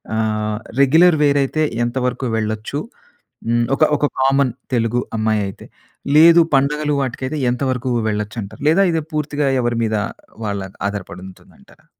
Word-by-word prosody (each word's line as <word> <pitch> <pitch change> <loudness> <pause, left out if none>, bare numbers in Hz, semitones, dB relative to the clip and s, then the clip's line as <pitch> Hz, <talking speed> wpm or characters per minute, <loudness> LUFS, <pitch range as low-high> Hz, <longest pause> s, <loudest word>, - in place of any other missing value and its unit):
ఆహ్, 110 -1 -1 0.2
regular 160 +5 +5
wear 145 0 +3
అయి‌తే 155 +3 0 0.2
ఎంతవరకు 125 +1 -2
వెళ్ళొచ్చు. 110 +5 -3 0.7
హ్మ్, 120 0 +2
ఒక 150 - +2
ఒక 145 - +1 0.2
కామన్ 135 -1 +3 0.2
తెలుగు 115 +1 +1 0.2
అమ్మాయి 110 -1 +1
అయితే. 95 - -10 0.5
లేదు 165 +2 +8
పండుగలు 150 +2 +1
వాటికైతే 130 +3 -3
ఎంతవరకు 130 0 -2 0.2
వెళ్లొచ్చు 105 0 -4
అంటారు? 100 +5 -10
లేదా 180 +5 +4
ఇది 165 -1 0
పూర్తిగా 150 -1 -1
ఎవరి 120 -1 -1
మీద 110 - -1 0.5
వాళ్ళ 100 -1 -2 0.3
ఆధారపడి 100 -2 -6
ఉంటుందంటారా? 95 - -20
125 Hz, 135 wpm, -19 LUFS, 110-145 Hz, 0.7 s, లేదు